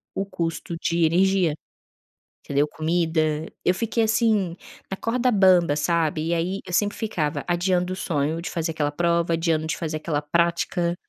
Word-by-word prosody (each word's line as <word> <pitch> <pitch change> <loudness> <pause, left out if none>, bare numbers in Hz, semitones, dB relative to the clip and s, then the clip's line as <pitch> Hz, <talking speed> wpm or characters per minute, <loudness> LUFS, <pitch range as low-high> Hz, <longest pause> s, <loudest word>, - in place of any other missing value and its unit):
o 195 - -1
custo 170 -3 -4
de 170 -1 +2
energia, 180 -1 +3 0.9
entendeu, 145 +1 +1
comida. 160 +1 0 0.4
Eu 180 - +3
fiquei 230 +3 0
assim, 215 -5 +1 0.3
na 195 - -4
corda 250 +3 0
bamba, 185 -6 +4
sabe, 155 0 0
e - - +1
aí 180 +4 -1
eu 180 - -8
sempre 205 +2 +1
ficava 165 -9 -2
adiando 180 +1 +1
o - - -4
sonho 160 -2 -1
de 170 - -5
fazer 165 -1 -2
aquela 150 -2 -1
prova, 170 +1 +1
adiando 165 -1 0
de - - -2
fazer 155 -1 -3
aquela 150 -1 -2
prática, 170 +2 0
170 Hz, 160 wpm, -24 LUFS, 160-185 Hz, 0.9 s, bamba